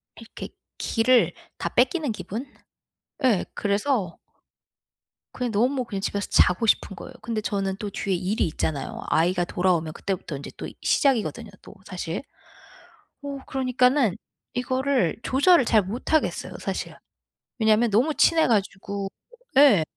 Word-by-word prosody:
이렇게 - - -9 0.3
기를 245 +2 +3 0.2
다 - - -2
뺏기는 315 -8 +2
기분? 210 +5 -5 0.8
예. 225 -8 +3
그래서 205 - 0 1.2
그냥 250 -2 -2
너무 250 +5 +1
그냥 200 -4 -4
집에서 200 0 -2
자고 180 +6 +4
싶은 200 - +2
거예요. - - -10
근데 230 -1 -2
저는 195 -2 -2
또 210 0 -4
뒤에 195 0 -2
일이 190 +4 0
있잖아요. 150 -2 -3
아이가 175 +2 +2
돌아오면 175 -3 0
그때부터 185 -5 -4
인제 140 - -8
또 - - -5
시작이거든요, 235 -4 +1
또 - - -13
사실. 180 -2 -4 1.0
어 280 -1 -4
그러니까는 255 -4 +2 0.4
이거를 255 - +1
조절을 285 +3 +4
잘 220 -2 +4
못하겠어요, 245 +10 -1
사실. - - -4 0.6
왜냐면 220 +1 +4
너무 250 +10 +3
친해 325 -1 +4
가지고 200 -2 -1 0.5
예. 265 - +7
215 Hz, 295 characters per minute, -25 LUFS, 190-255 Hz, 1.2 s, 예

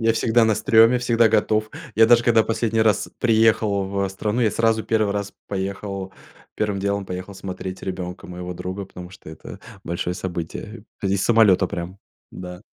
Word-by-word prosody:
Я 115 0 +3
всегда 115 +1 +3
на 110 -1 +3
стрёме, 115 +4 +5
всегда 115 -2 +3
готов. 110 0 +1 0.3
Я 110 0 +7
даже 120 0 +5
когда 115 -2 +4
последний 115 0 0
раз 110 -3 +1
приехал 110 -3 +2
в 100 0 -1
страну, 105 +5 -2
я 110 - +3
сразу 115 -1 +1
1 110 -2 +1
раз 100 -1 -4 0.2
поехал, 100 0 -4 0.4
1 105 -2 -1
делом 100 0 -1
поехал 90 +2 -7
смотреть 95 0 -7
ребенка 90 -1 -6
моего 90 0 -6
друга, 95 +2 -5
потому 90 -1 -11
что 95 - -14
это 80 - -10 0.3
большое 85 +1 -3
событие. 95 +5 -6 0.2
П 95 - -1
из 95 0 0
самолета 105 -5 +4
прям, 90 +3 -6 0.3
да. 90 0 -9
100 Hz, 170 wpm, -22 LUFS, 95-110 Hz, 0.4 s, Я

